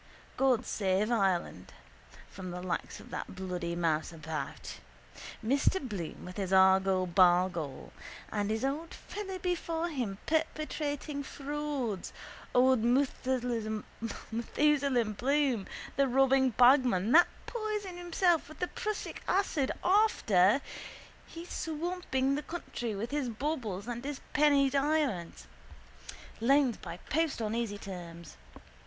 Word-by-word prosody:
God 255 -2 +2
save 195 +2 0
Ireland 190 - 0 0.5
from 185 -1 -8
the 180 0 -6
likes 185 - -3
of - - -14
that - - -5
bloody 180 -2 -3
mouseabout. 160 -1 -3 0.7
Mr 275 +9 +2
Bloom 200 - -6
with 180 0 -9
his 190 -2 -2
argol 190 0 +5
bargol. 175 -4 +2 0.4
And 205 -1 -1
his 220 +4 0
old 300 +5 -3
fellow 390 -2 -6
before 345 -2 -2
him 240 - -3
perpetrating 305 -2 -2
frauds, 280 -7 -4 0.4
old 255 -1 +5
Methusalem 245 -3 0 0.2
Bloom, 250 0 0 0.3
the 275 -1 +3
robbing 265 +1 +4
bagman, 245 -5 +4
that 345 +4 +8 0.2
poisoned 420 -6 -4
himself 350 -2 +1
with 310 - -11
the 360 - -2
prussic 425 0 -4
acid 360 -8 +1
after 275 - +4 0.7
he 335 +1 -9
swamping 320 -5 -2
the 290 - -1
country 245 -9 -5
with 225 +4 -4
his 285 -4 -1
baubles 230 -6 -3
and 240 0 -4
his 285 0 -4
penny 285 -2 +5
diamonds. 275 - 0 0.9
Loans 265 +1 +3
by 170 - -8
post 320 -2 +1
on 220 -1 -2
easy 230 -3 -2
terms. 170 -4 -9
255 Hz, 115 wpm, -31 LUFS, 195-295 Hz, 0.9 s, that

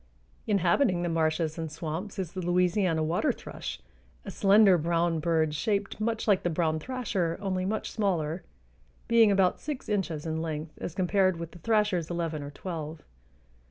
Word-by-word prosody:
Inhabiting 185 0 +2
the 175 - 0
marshes 160 0 0
and 160 -2 -4
swamps 160 +6 -5
is 185 -4 -3
the 185 - -5
Louisiana 180 -1 +2
water 165 +3 +1
thrush, - - -7 0.5
a - - -5
slender 200 -1 +6
brown 165 +1 +1
bird 160 -1 +1
shaped 200 +5 -1
much 225 +1 -1
like 200 -3 +4
the 175 - 0
brown 160 -1 0
thrasher, 200 -8 -2
only 185 -2 -1
much 215 +3 -2
smaller, 175 -6 -1 0.7
being 230 -2 +6
about 190 -2 +3
six 295 -4 -5
inches 175 -7 -1
in 160 0 -2
length 155 -1 -4
as 165 - -5
compared 185 -1 +2
with 170 -1 -6
the 175 - -13
thrasher's 210 -5 +1
eleven 165 -3 -2
or 145 - -6
twelve. 155 0 -6
175 Hz, 160 wpm, -28 LUFS, 160-200 Hz, 0.7 s, slender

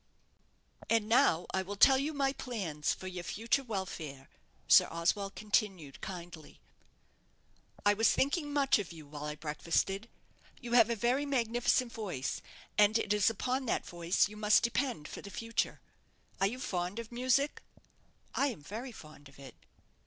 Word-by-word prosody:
"And 225 -2 +2
now 180 -7 +4
I 190 - +1
will 195 +2 -6
tell 265 +6 +6
you 290 +3 -1
my 275 -2 0
plans 185 - -3
for - - -5
your 180 -1 -5
future 230 +9 0
welfare," 180 - -5 0.4
Sir - - +7
Oswald 195 +4 -1
continued, 195 - -1
kindly. 175 -4 -8 1.3
"I 205 - +6
was 225 +2 +4
thinking 290 +2 0
much 280 -5 +3
of 200 - -5
you 160 -3 -11
while 145 +1 -7
I 150 0 -4
breakfasted. 165 +7 -1 0.5
You 240 -2 -8
have 235 -2 +6
a 235 - +1
very 250 +6 +1
magnificent 240 -1 +1
voice; 180 - -3 0.4
and 210 +2 +6
it 210 -2 0
is 210 -1 +4
upon 255 +4 -2
that - - 0
voice 175 +2 +1
you 210 - -11
must 210 0 +4
depend 235 - -1
for - - -8
the 200 - -9
future. 230 +2 -2 0.6
Are 195 - +4
you 235 +5 -4
fond 180 -4 -3
of 230 0 -6
music?" 255 +4 +1 0.7
"I 280 - +2
am 235 - -5
very 230 - -6
fond 155 -8 -13
of 135 - -19
it." 140 -1 -11
210 Hz, 160 wpm, -32 LUFS, 175-240 Hz, 1.3 s, Sir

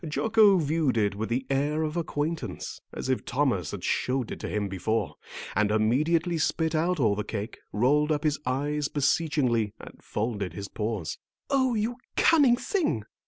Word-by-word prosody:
Jocko 215 +3 +4
viewed 155 -5 +1
it 100 -3 +2
with 110 +2 -4
the 125 +3 -1
air 145 +3 0
of 155 +1 -3
acquaintance, 150 - -3
as - - -5
if 130 -1 0
Thomas 125 - 0
had - - -6
showed 125 -2 0
it - - -5
to - - -5
him 105 -1 -1
before, 100 +2 -1 0.4
and 105 +1 +3
immediately 155 +11 +2
spit 160 +1 0
out 170 +2 +1
all 110 -6 +3
the 105 +1 -2
cake, 105 +2 -5
rolled 145 +8 +2
up 150 -1 0
his 155 -1 +1
eyes 145 +3 -1
beseechingly, 140 -7 +1
and - - -12
folded 105 -5 -3
his 100 +2 -6
paws. 105 -7 -3 0.3
"Oh, 260 -3 +2
you 225 +3 -1 0.2
cunning 285 -7 +5
thing!" 295 - -1
140 Hz, 165 wpm, -27 LUFS, 110-160 Hz, 0.4 s, cunning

